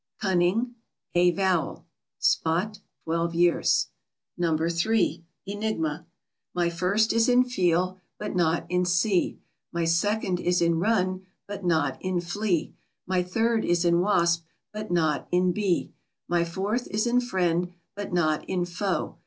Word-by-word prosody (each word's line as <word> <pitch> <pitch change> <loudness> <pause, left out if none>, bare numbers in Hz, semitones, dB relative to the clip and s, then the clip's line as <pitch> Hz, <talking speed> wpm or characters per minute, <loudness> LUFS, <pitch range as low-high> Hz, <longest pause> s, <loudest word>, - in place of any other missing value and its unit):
Cunning. 200 +6 +1 0.4
A 175 0 +5
vowel. 185 -2 0 0.3
SPOT 180 +6 +1 0.2
(twelve 165 +1 -1
years). 175 0 +3 0.5
No. 165 -3 +1
3. 170 +1 +1 0.2
ENIGMA. 185 -6 -3 0.5
My 175 -1 +1
first 195 +6 +1
is 230 +1 +3
in 250 0 +5
feel, 185 -6 0 0.2
but 210 -2 -5
not 170 -2 +1
in 180 0 +1
see. 180 +2 +1 0.3
My 170 -1 -1
second 185 +2 +1
is 180 0 +1
in 170 -1 +2
run, 185 -2 0 0.2
but 200 -1 -6
not 160 -6 +1
in 185 -1 -1
flee. 175 0 -1 0.3
My 185 0 +1
third 225 +5 0
is 175 0 +1
in 170 0 +4
wasp, 170 -3 +2 0.3
but 215 0 -5
not 160 -4 +1
in 180 0 +2
bee. 190 -2 0 0.4
My 170 -1 +1
fourth 200 +8 -2
is 210 +3 -1
in 245 +1 +3
friend, 180 -6 0 0.2
but 205 0 -6
not 155 -3 +1
in 180 -2 0
foe. 185 +2 -3
180 Hz, 140 wpm, -26 LUFS, 170-205 Hz, 0.5 s, A